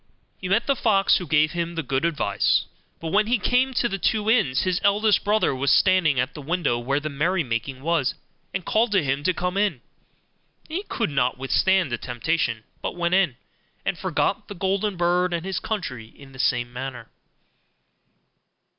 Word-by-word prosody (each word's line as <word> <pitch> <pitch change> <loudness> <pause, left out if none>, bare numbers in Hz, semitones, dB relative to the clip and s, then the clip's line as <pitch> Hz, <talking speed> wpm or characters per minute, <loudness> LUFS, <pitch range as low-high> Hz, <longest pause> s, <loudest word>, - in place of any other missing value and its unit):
He 185 - -5
met 225 +5 +2
the 275 - +2
fox, 200 -5 +3
who 180 - -6
gave 155 +1 +3
him 170 0 -3
the 165 - -2
good 135 +3 -1
advice: 120 -12 +1 0.3
but 165 - -5
when 210 +3 +3
he 245 +2 +3
came 250 +4 +2
to 240 - +2
the 195 -4 -4
two 215 +3 +1
inns, 170 - +2
his 185 -1 0
eldest 205 +1 +3
brother 210 -4 +2
was 135 +1 -1
standing 180 -8 +4
at 130 +3 -1
the 150 - -8
window 150 -5 0
where 135 +4 0
the 150 - -5
merrymaking 140 -5 -2
was, 165 -5 +1 0.4
and 195 -2 -4
called 225 +1 +2
to 190 -4 +3
him 140 +1 -1
to 185 - +3
come 180 +1 -2
in; 205 -1 +2
and 125 - -24 0.9
he 345 +6 -3
could 230 -10 -1
not 125 -3 +1
withstand 175 +5 +2
the 120 - -2
temptation, 120 -2 -1 0.2
but - - -4
went 170 0 0
in, 185 -10 +2 0.5
and - - 0
forgot - - -1
the 205 - -8
golden 195 +1 -1
bird 175 +1 +1
and 170 +1 -4
his 190 -2 -2
country 130 - -4
in 135 +4 -16
the 130 - -14
same 120 -1 0
manner. 125 -2 -6
170 Hz, 190 wpm, -24 LUFS, 135-195 Hz, 0.9 s, standing